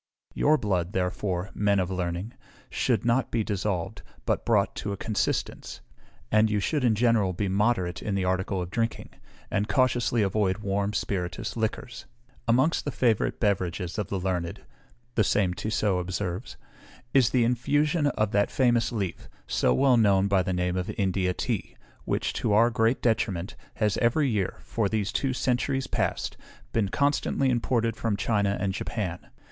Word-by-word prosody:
Your 155 +2 +3
blood, 95 - -1
therefore, 90 0 -2
men 100 -1 +2
of 95 0 -1
learning, 90 +4 -3 0.4
should - - 0
not 120 +2 +2
be 115 -2 0
dissolved, 100 -1 -2 0.2
but - - -1
brought - - +2
to 105 - -3
a 100 - -3
consistence; 110 +1 -2 0.5
and 110 +1 +4
you 105 -1 +1
should 145 +7 0
in 115 -3 +3
general 110 -4 +2
be 100 +3 -2
moderate 95 -2 0
in 100 - -2
the 95 -1 0
article 95 +1 0
of 90 - -8
drinking, 115 0 -2 0.4
and 105 +2 0
cautiously 120 -4 +2
avoid 95 -1 +1
warm 100 0 -1
spirituous 90 -3 -3
liquors. 115 +1 -3 0.4
"Amongst 130 +8 +3
the - - -2
favorite 115 -6 +1
beverages 90 -3 -1
of 105 - -2
the 100 - -2
learned," 90 -2 -3 0.5
the 110 - +3
same 95 -2 +2
Tissot 105 -2 0
observes, 95 +3 -4 0.6
"is 130 -4 +5
the 125 -2 +2
infusion 145 +6 +1
of 110 -7 0
that 100 0 +2
famous 120 -3 +2
leaf, 100 -6 -4 0.2
so 65 - +1
well 125 - +4
known 100 -3 +4
by 100 -1 +3
the 95 +1 -2
name 90 0 0
of 90 - -2
India 95 -2 +1
tea, - - -3 0.3
which, - - -1
to 105 - 0
our 115 +3 +5
great 115 +2 +1
detriment, 105 -5 0 0.2
has 105 -3 +1
every 125 +5 +2
year, 105 -7 -1
for 110 -4 -1
these 105 -1 -1
two 135 +1 0
centuries 130 +1 0
past, - - -2 0.4
been 105 -4 +1
constantly 140 0 +1
imported 115 -2 0
from 110 -3 -1
China 100 -3 +1
and 95 0 -1
Japan. 95 -4 -4
105 Hz, 165 wpm, -27 LUFS, 95-120 Hz, 0.6 s, is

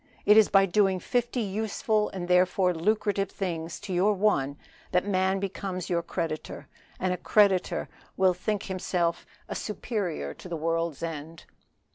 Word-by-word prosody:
It 210 - +7
is 220 -1 +6
by 195 -1 +5
doing 195 0 +2
fifty 245 +3 -1
useful 215 +1 0
and 180 -2 -5
therefore 180 0 +3
lucrative 200 +2 0
things 170 -4 -4
to 205 -2 -5
your 190 +4 +3
one 145 -9 +1 0.3
that 180 +1 +2
man 190 -1 +1
becomes 190 -2 -4
your 170 -1 +2
creditor, 165 -2 -4 0.3
and 185 0 0
a - - -3
creditor 200 -3 +2 0.3
will 190 -1 +4
be 205 +4 -2 0.9
a - - -5
superior 195 - -3
to 180 - -11
the 170 - -3
world's 165 -1 -1
end. 165 0 -6
185 Hz, 145 wpm, -27 LUFS, 170-205 Hz, 0.9 s, It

